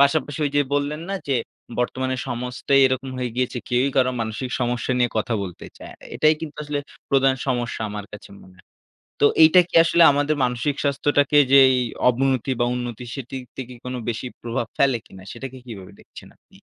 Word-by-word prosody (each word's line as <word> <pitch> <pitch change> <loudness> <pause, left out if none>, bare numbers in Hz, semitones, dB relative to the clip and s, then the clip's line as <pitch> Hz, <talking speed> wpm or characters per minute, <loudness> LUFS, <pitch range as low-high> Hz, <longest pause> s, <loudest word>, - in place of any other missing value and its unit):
পাশাপাশি 145 +1 +2
ওইযে 145 0 +1
বললেন 145 +2 -1
না - - -1
যে? 135 - +2 0.4
বর্তমানে 130 +1 -1
সমস্তই 125 +3 0
এরকম 130 0 -2
হয়ে 125 -1 -2
গিয়েছে। 125 -1 -1
কেউই 125 +3 +2
কারো 130 -1 +4
মানসিক 110 +3 -3
সমস্যা 120 +1 -1
নিয়ে 120 -1 +2
কথা 110 +2 0
বলতে 90 -3 -8
চায় - - -11
না। - - -14
এটাই 155 0 +4
কিন্তু 150 -3 -7
আসলে 145 -1 -3 0.3
প্রধান 135 -1 +4
সমস্যা 120 -4 -2
আমার 105 -1 -6
কাছে 105 - -11
মনে 95 0 -18
হয়। - - -22 0.6
তো - - +6 0.2
এইটা 160 +3 +7
কি - - -28
আসলে 170 0 +4
আমাদের 145 +2 +1
মানসিক 125 +3 -1
স্বাস্থ্যটাকে 145 0 +2 0.2
যেই 135 -1 +7 0.3
অবনতি 130 +1 0
বা 120 - +3
উন্নতি 120 -1 -5
সেটির 130 -1 -7
থেকে 125 -1 -7
কোনো 125 0 -4
বেশি 120 +2 -4
প্রভাব 115 -1 -3
ফেলে 135 -3 +3
কিনা 95 -1 -14
সেটাকে 130 -1 -8
কিভাবে 100 -6 -10
দেখছেন - - -14
আপনি? - - -23
130 Hz, 180 wpm, -22 LUFS, 120-140 Hz, 0.6 s, এইটা